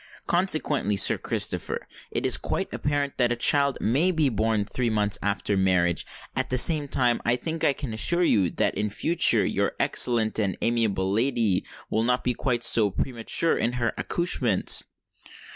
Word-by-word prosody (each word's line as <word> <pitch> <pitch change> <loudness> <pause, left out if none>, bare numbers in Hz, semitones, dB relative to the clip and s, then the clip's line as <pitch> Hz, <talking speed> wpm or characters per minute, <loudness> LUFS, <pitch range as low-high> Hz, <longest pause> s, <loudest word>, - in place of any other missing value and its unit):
Consequently, 155 - 0
Sir - - +4
Christopher, - - -2 0.2
it - - -3
is - - +3
quite - - -3
apparent 145 -1 -2
that 120 -1 +3
a - - +1
child 140 +3 +2
may 140 +11 +2
be 160 -6 +1
born 110 -2 0
three 120 +3 -2
months 105 -2 +1
after 100 0 -1
marriage; 90 -3 +1 0.3
at - - -2
the 130 - 0
same 150 +2 +4
time, 125 -3 0
I 120 - +2
think 160 +6 -4
I 140 - +3
can 135 -5 -6
assure 170 +11 +1
you, 100 - +2
that - - -1
in 105 0 -2
future 130 - +1
your - - -1
excellent 115 -3 +1
and 100 -4 -1
amiable 110 -5 0
lady 115 -3 +1 0.3
will 110 - +1
not 125 +2 0
be 125 - 0
quite 120 -1 -2
so 110 -3 +3
premature 120 - -1
in 115 +2 -1
her 120 -2 -1
accouchements." 130 - +1
120 Hz, 170 wpm, -25 LUFS, 105-140 Hz, 0.3 s, Sir